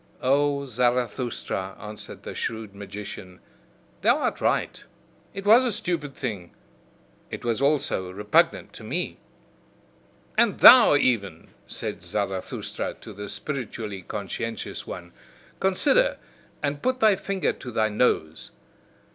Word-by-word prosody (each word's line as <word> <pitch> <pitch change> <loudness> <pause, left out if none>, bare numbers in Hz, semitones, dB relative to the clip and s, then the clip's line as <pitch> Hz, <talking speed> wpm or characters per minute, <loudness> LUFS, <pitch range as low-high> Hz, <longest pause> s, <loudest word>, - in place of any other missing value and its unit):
"O 140 +1 +2
Zarathustra," 120 -5 -1
answered 105 0 -9
the - - -6
shrewd 110 -3 -4
magician, 100 -2 -8 0.6
"thou - - +4
art - - -2
right, - - 0 0.5
it 195 0 -7
was 225 +5 +7
a 250 - +1
stupid 170 - -2
thing, 100 -9 -5 0.7
it - - -7
was 115 +1 0
also 140 -10 +1
repugnant 105 +2 +1
to - - -10
me." - - -3 1.2
"And 235 -4 +3
thou 245 - +9
even," 100 - 0 0.2
said - - -4
Zarathustra 95 -3 -3
to - - -11
the 100 0 -7
spiritually 110 -4 -5
conscientious 105 +4 -5
one, 85 -1 -8 0.5
"consider, 300 - +3 0.5
and 145 0 -1
put 255 0 0
thy 215 -3 +5
finger 195 0 -1
to 125 - -9
thy 110 -2 +1
nose! 80 -8 0
120 Hz, 120 wpm, -25 LUFS, 100-150 Hz, 1.2 s, thou